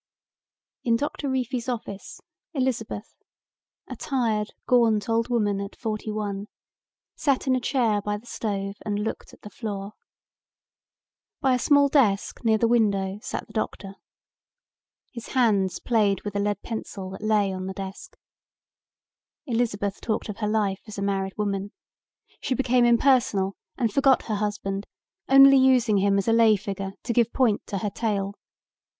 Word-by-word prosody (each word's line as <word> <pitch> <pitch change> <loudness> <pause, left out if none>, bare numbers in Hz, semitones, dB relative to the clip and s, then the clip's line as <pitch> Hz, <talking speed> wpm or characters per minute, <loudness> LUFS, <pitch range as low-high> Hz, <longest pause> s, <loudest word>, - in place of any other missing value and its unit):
In 230 -1 +3
Doctor 285 +2 -2
Reefy's 255 -1 -2
office, 220 -5 -6 0.3
Elizabeth, 240 -5 -2 0.7
a - - -6
tired 225 -6 -1 0.2
gaunt 225 -4 +3
old 230 +1 +1
woman 205 -4 +1
at 200 - -7
forty 215 -1 -4
one, 205 -1 -3 0.7
sat 275 -2 +1
in 260 -1 +3
a - - +1
chair 235 -6 +1
near 205 0 -1
the 215 - -15
stove 200 -4 -3
and 205 -1 -2
looked 210 +2 -4
at - - -19
the 210 - -9
floor. 200 -2 -5 1.5
By 265 -1 +2
a 250 - +1
small 285 +2 +4
desk 240 -10 +1
near 220 -1 +3
the 230 - +2
window 200 -4 +1
sat - - -5
the - - -18
doctor. 200 -3 -3 1.2
His 235 -2 -8
hands 200 -7 +3
played 210 -5 +1
with 205 -1 -5
a - - +1
lead 205 0 -1
pencil 200 -4 -6
that 190 - -8
lay 210 -2 +2
on 185 0 -5
the 190 - -4
desk. 190 0 -8 1.3
Elizabeth 225 -6 -1
talked 215 -1 -2
of 210 - -5
her 210 - -2
life 205 -3 0
as 215 - -8
a 200 - -2
married 195 -1 -2
woman. 200 -1 -2 0.7
She 260 - -1
became 250 -1 +3
impersonal 235 -5 +3 0.2
and 230 -5 0
forgot 270 0 +4
her 215 - -2
husband, 205 -1 -3 0.4
only 275 0 +8
using 255 -5 +4
him 200 0 +3
as 200 - -1
a 225 - +4
lay 225 -2 +6
figure 195 -1 -5
to 235 - -2
give 235 0 +2
point 235 -6 +1
to 200 - -3
her 205 +1 -2
tale. 200 -2 -2
215 Hz, 155 wpm, -25 LUFS, 200-240 Hz, 1.5 s, only